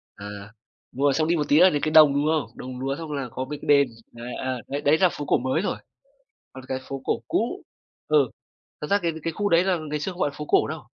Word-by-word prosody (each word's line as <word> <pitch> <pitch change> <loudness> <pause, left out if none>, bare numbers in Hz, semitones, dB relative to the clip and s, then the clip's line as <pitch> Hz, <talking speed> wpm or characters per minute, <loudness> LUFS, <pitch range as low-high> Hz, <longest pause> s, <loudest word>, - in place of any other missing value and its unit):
À, 100 - -10 0.7
đúng 135 +3 -4
rồi, 140 -1 +4
xong 155 +3 +1
đi 170 - +2
một 150 -2 -1
tí 150 - +5
là 185 +1 +8
đến 145 -4 -1
cái 155 - 0
đồng, 155 -3 +7
đúng 145 +1 +1
không? 155 -2 +1
Đồng 125 0 -7
lúa 135 +1 -2
xong 160 -2 -7
là 140 -3 -3
có 130 - -4
mấy 150 +1 -6
cái - - -9
đền, 140 -2 +6 0.2
đấy, 120 +1 -8
à, 130 -1 -3
đấy 140 +1 -3
đấy 150 +3 +4
là 185 0 +4
phố 145 - -6
cổ - - +3
mới 130 +7 -1
rồi. - - -2 0.8
Còn 130 0 -11
cái 130 - -2
phố 135 -1 -5
cổ - - 0
cũ - - -1 0.5
ừ, 145 -5 +4 0.5
thật 150 - -4
ra 200 - +4
cái 170 -1 0
cái 165 - -2
khu 205 -1 -1
đấy 170 +2 +4
là 185 -2 +1
ngày 150 0 -2
xưa 190 - -3
không 180 - -12
gọi 145 - +2
là 145 - -13
phố 150 - -5
cổ - - +3
đâu. 155 -1 -5
150 Hz, 280 wpm, -24 LUFS, 135-160 Hz, 0.8 s, là